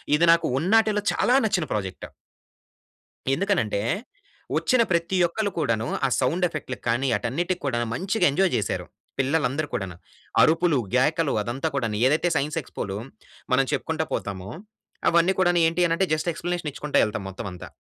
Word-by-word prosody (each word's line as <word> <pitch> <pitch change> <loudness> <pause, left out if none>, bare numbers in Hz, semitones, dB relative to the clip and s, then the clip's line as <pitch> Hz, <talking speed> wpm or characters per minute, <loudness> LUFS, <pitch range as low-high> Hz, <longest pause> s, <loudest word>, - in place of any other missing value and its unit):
ఇది 165 +3 +4
నాకు 170 0 +3
ఉన్నాటిలో 210 +4 +3
చాలా 245 - +2
నచ్చిన 185 -6 +1
ప్రోజెక్ట్... 95 -3 -4 1.3
ఎందుకని 195 +5 +1
అంటే, 105 -2 -2 0.8
వచ్చిన 255 -2 +3
ప్రతి 170 +2 +1
ఒక్కళ్ళు 200 +4 -2
కూడాను, 115 -6 0 0.2
ఆ - - +4
సౌండ్ 165 +8 +1
ఎఫెక్ట్‌లకి 135 -5 -6
కానీ 120 +4 +1
ఆటన్నిటికి 170 +10 -2
కూడాను 120 -3 0
మంచిగా 190 - 0
ఎంజాయ్ 190 +5 +2
చేసారు. 105 - -2 0.3
పిల్లలు 140 +3 +2
అందరు 150 +3 -2
కూడాన. 100 -6 -3 0.5
అరుపులు, 165 -3 +3 0.2
గేకలు 150 +3 +2
అదంతా 120 +8 -3
కూడాను 115 -6 -1
ఏదైతే 155 +5 +2
సైన్స్ 150 +3 -1
ఎక్స్‌పోలో, 100 0 -5 0.6
మనం 135 +1 +4
చెప్పుకుంటూ 160 0 -1
పోతామో, 95 -1 -4 0.6
అవన్నీ 170 +3 +3
కూడాను 175 -2 +3
ఏంటి 175 +1 +2
అనంటే, 170 +3 +1
జస్ట్ 155 +3 -1
ఎక్స్‌ప్లనేషన్ 170 -2 -3
ఇచ్చుకుంటూ 150 0 0
ఎళ్తాం 105 -2 -4
మొత్తం 95 +1 -6
అంతా. 90 - -9
155 Hz, 150 wpm, -25 LUFS, 120-175 Hz, 1.3 s, ఇది